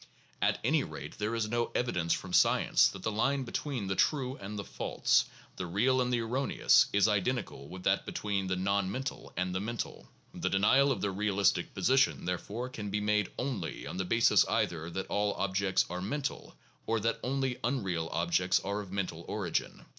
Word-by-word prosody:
At -, -, +2 dB
any -, -, +3 dB
rate, -, -, -8 dB
there 105 Hz, +2 st, -1 dB
is 115 Hz, -2 st, 0 dB
no 120 Hz, +1 st, 0 dB
evidence 90 Hz, -9 st, 0 dB
from -, -, -1 dB
science -, -, +5 dB
that -, -, -7 dB
the 110 Hz, -, 0 dB
line 135 Hz, +6 st, +1 dB
between 125 Hz, -2 st, -3 dB
the 95 Hz, -, -1 dB
true 130 Hz, 0 st, +1 dB
and 100 Hz, +2 st, -7 dB
the 100 Hz, -, -3 dB
false, -, -, +1 dB, 0.3 s
the 90 Hz, -, -3 dB
real 125 Hz, +9 st, +2 dB
and 125 Hz, 0 st, 0 dB
the 120 Hz, -1 st, +1 dB
erroneous, 125 Hz, +5 st, +3 dB
is 100 Hz, +1 st, +4 dB
identical 105 Hz, -, -1 dB
with 90 Hz, +2 st, -9 dB
that -, -, +1 dB
between 100 Hz, -2 st, -2 dB
the 95 Hz, -, 0 dB
non 95 Hz, +1 st, 0 dB
mental 135 Hz, +4 st, -5 dB
and 90 Hz, 0 st, -1 dB
the 95 Hz, -, -1 dB
mental. 115 Hz, +3 st, -5 dB, 0.2 s
The -, -, -2 dB
denial 130 Hz, +8 st, +4 dB
of 130 Hz, -, -1 dB
the 100 Hz, -, 0 dB
realistic 100 Hz, 0 st, +1 dB
position, 130 Hz, +1 st, +2 dB
therefore, 100 Hz, +7 st, -3 dB
can 105 Hz, -5 st, -6 dB
be 105 Hz, +1 st, -1 dB
made 105 Hz, -1 st, +1 dB
only 125 Hz, -11 st, -3 dB
on -, -, -6 dB
the 95 Hz, -, 0 dB
basis 115 Hz, +5 st, +5 dB
either 80 Hz, -1 st, -1 dB
that 95 Hz, +2 st, -4 dB
all 105 Hz, 0 st, 0 dB
objects 95 Hz, 0 st, +1 dB
are 90 Hz, +1 st, -5 dB
mental 140 Hz, +8 st, -4 dB, 0.3 s
or 115 Hz, 0 st, +1 dB
that 115 Hz, +2 st, 0 dB
only 130 Hz, -1 st, -1 dB
unreal 95 Hz, -10 st, -1 dB
objects 90 Hz, +2 st, +2 dB
are 100 Hz, +1 st, -2 dB
of 100 Hz, -3 st, -10 dB
mental 95 Hz, -1 st, -3 dB
origin. -, -, -3 dB
105 Hz, 190 wpm, -31 LUFS, 95-125 Hz, 0.3 s, science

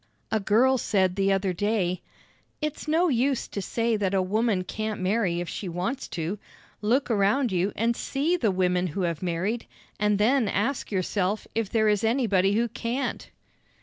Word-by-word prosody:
A 220 Hz, -, +2 dB
girl 245 Hz, +6 st, +3 dB
said 190 Hz, -4 st, +1 dB
the 195 Hz, 0 st, +2 dB
other 195 Hz, -1 st, +1 dB
day: 185 Hz, -2 st, 0 dB, 0.6 s
"It's 305 Hz, 0 st, -4 dB
no 330 Hz, +4 st, +3 dB
use 265 Hz, -2 st, +1 dB
to 200 Hz, -, -4 dB
say 230 Hz, +3 st, 0 dB
that 200 Hz, -1 st, 0 dB
a -, -, +3 dB
woman 210 Hz, 0 st, +1 dB
can't 215 Hz, +3 st, -4 dB
marry 185 Hz, -2 st, +1 dB
if 175 Hz, -, -5 dB
she 190 Hz, -, -5 dB
wants 185 Hz, +11 st, -3 dB
to. 170 Hz, +5 st, -4 dB, 0.4 s
Look 245 Hz, +5 st, +1 dB
around 220 Hz, +4 st, +2 dB
you, 185 Hz, +2 st, +1 dB
and 230 Hz, +2 st, +1 dB
see 290 Hz, +9 st, 0 dB
the 235 Hz, -12 st, +1 dB
women 180 Hz, -1 st, +1 dB
who 175 Hz, +4 st, -3 dB
have 170 Hz, -3 st, -1 dB
married, 185 Hz, +6 st, -2 dB, 0.3 s
and 210 Hz, 0 st, +2 dB
then 230 Hz, +3 st, +3 dB
ask 230 Hz, +8 st, -1 dB
yourself 195 Hz, +1 st, -1 dB
if 225 Hz, -3 st, -1 dB
there 220 Hz, 0 st, +2 dB
is 210 Hz, -1 st, +2 dB
anybody 215 Hz, -5 st, +2 dB
who 235 Hz, +2 st, +2 dB
can't!" 235 Hz, +3 st, -3 dB
210 Hz, 175 wpm, -26 LUFS, 185-235 Hz, 0.6 s, girl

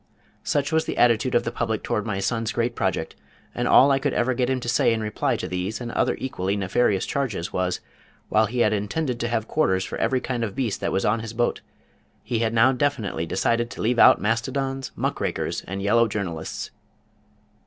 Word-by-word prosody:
Such 145 Hz, +1 st, 0 dB
was 160 Hz, 0 st, +2 dB
the -, -, -4 dB
attitude 120 Hz, -2 st, +3 dB
of -, -, +3 dB
the -, -, -3 dB
public -, -, -2 dB
toward 105 Hz, +2 st, -2 dB
my 105 Hz, -3 st, -2 dB
son's 115 Hz, +2 st, -1 dB
great 120 Hz, 0 st, -1 dB
project, 95 Hz, -6 st, -2 dB, 0.4 s
and -, -, -1 dB
all 140 Hz, +2 st, +7 dB
I 135 Hz, -, +3 dB
could 140 Hz, 0 st, -1 dB
ever 125 Hz, +2 st, +1 dB
get 125 Hz, 0 st, 0 dB
him 130 Hz, -1 st, 0 dB
to 120 Hz, -, -6 dB
say 120 Hz, -, +3 dB
in 115 Hz, -, -1 dB
reply 105 Hz, -1 st, -1 dB
to -, -, -4 dB
these 90 Hz, +4 st, -3 dB
and 120 Hz, -1 st, -5 dB
other -, -, +1 dB
equally 100 Hz, -7 st, -2 dB
nefarious 100 Hz, +1 st, +1 dB
charges 120 Hz, -, -2 dB
was, 90 Hz, -1 st, -1 dB, 0.5 s
while 110 Hz, 0 st, +3 dB
he 120 Hz, +3 st, -1 dB
had 110 Hz, -2 st, +3 dB
intended 120 Hz, +5 st, -2 dB
to 120 Hz, -, -1 dB
have 115 Hz, -2 st, -1 dB
quarters 95 Hz, -12 st, +1 dB
for -, -, -6 dB
every 130 Hz, -, +1 dB
kind 125 Hz, -2 st, -3 dB
of 105 Hz, -4 st, -4 dB
beast 120 Hz, -7 st, -2 dB
on -, -, +1 dB
board 105 Hz, +4 st, +1 dB
his 115 Hz, 0 st, -7 dB
boat, 120 Hz, +1 st, 0 dB, 0.6 s
he 120 Hz, -3 st, -1 dB
had 110 Hz, -1 st, +1 dB
now 115 Hz, +3 st, +5 dB
definitely 125 Hz, -, -1 dB
decided 115 Hz, +6 st, 0 dB
to -, -, -7 dB
leave 120 Hz, +2 st, +1 dB
out -, -, +7 dB
Mastodons, 135 Hz, +4 st, -2 dB
Muck -, -, -2 dB
Rakers -, -, -2 dB
and 95 Hz, +1 st, -4 dB
Yellow 115 Hz, +3 st, +4 dB
Journalists! 95 Hz, -7 st, -4 dB
115 Hz, 205 wpm, -24 LUFS, 100-125 Hz, 0.6 s, all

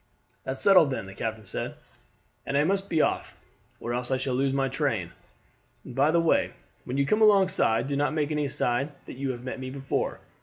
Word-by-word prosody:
"That's 130 Hz, 0 st, -4 dB
settled, 185 Hz, -7 st, +6 dB
then," 130 Hz, -7 st, -3 dB
the 95 Hz, -, -10 dB
captain 110 Hz, +1 st, -4 dB
said, -, -, -4 dB, 0.7 s
"and 140 Hz, -, -1 dB
I 145 Hz, -, +4 dB
must 195 Hz, +4 st, 0 dB
be 160 Hz, -2 st, +3 dB
off, -, -, -2 dB, 0.4 s
or 120 Hz, -, -3 dB
else 125 Hz, 0 st, -2 dB
I 130 Hz, -, +2 dB
shall 130 Hz, 0 st, -2 dB
lose 135 Hz, +2 st, +1 dB
my 135 Hz, 0 st, +1 dB
train. 130 Hz, -, -1 dB, 0.7 s
By 135 Hz, +4 st, +1 dB
the 170 Hz, +2 st, +3 dB
way, 165 Hz, -1 st, +2 dB, 0.3 s
when 130 Hz, -, -3 dB
you 140 Hz, -, +3 dB
come 215 Hz, +9 st, +1 dB
alongside 190 Hz, -, +4 dB
do 140 Hz, +1 st, -2 dB
not 145 Hz, +2 st, 0 dB
make 150 Hz, -1 st, 0 dB
any 150 Hz, -1 st, 0 dB
sign 135 Hz, +2 st, -1 dB
that -, -, -9 dB
you 135 Hz, -1 st, -1 dB
have 120 Hz, -1 st, -4 dB
met 130 Hz, 0 st, -5 dB
me 130 Hz, 0 st, -5 dB
before. 135 Hz, 0 st, -2 dB
135 Hz, 205 wpm, -27 LUFS, 125-150 Hz, 0.7 s, settled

